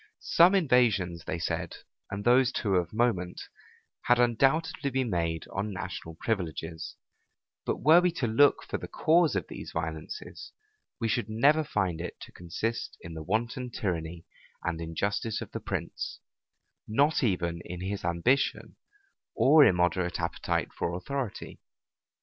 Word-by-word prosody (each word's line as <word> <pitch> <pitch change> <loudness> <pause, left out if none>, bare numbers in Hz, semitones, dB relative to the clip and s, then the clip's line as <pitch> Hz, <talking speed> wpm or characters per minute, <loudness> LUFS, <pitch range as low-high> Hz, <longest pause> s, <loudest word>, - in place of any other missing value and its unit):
Some 175 +4 +5
invasions, 110 - +2
they - - -3
said, 85 - -3 0.3
and 100 +1 -4
those 125 +1 +5
too 100 -4 -1
of 85 -2 -1
moment, 105 -6 0 0.7
had 125 - +5
undoubtedly 135 +5 +2
been 130 -3 -1
made 85 -2 -1
on 100 +2 -2
national 90 -3 -6
privileges: 80 -5 -3 0.7
but - - -1
were 160 +4 +7
we 180 - +3
to 130 - -1
look 120 +6 +4
for - - -4
the - - -7
cause 165 -4 +3
of 95 - -1
these - - -8
violences, 80 -1 -6 0.5
we 115 - 0
should 105 -1 -1
never 145 +8 +4
find 95 - -1
it 90 - -6
to - - -10
consist 110 +7 -4
in 80 - -8
the 80 - -6
wanton 115 - -2
tyranny 85 -6 -3 0.4
and 85 -1 -2
injustice 100 +6 -2
of - - -8
the - - -4
prince, - - -4 0.7
not 145 +8 +2
even 85 -6 0
in 90 0 -7
his 100 +2 -3
ambition 85 +11 0 0.6
or 150 +3 +7
immoderate 90 - +2
appetite 85 -1 -2
for 85 - -2
authority. 135 +3 -5
100 Hz, 145 wpm, -29 LUFS, 85-125 Hz, 0.7 s, were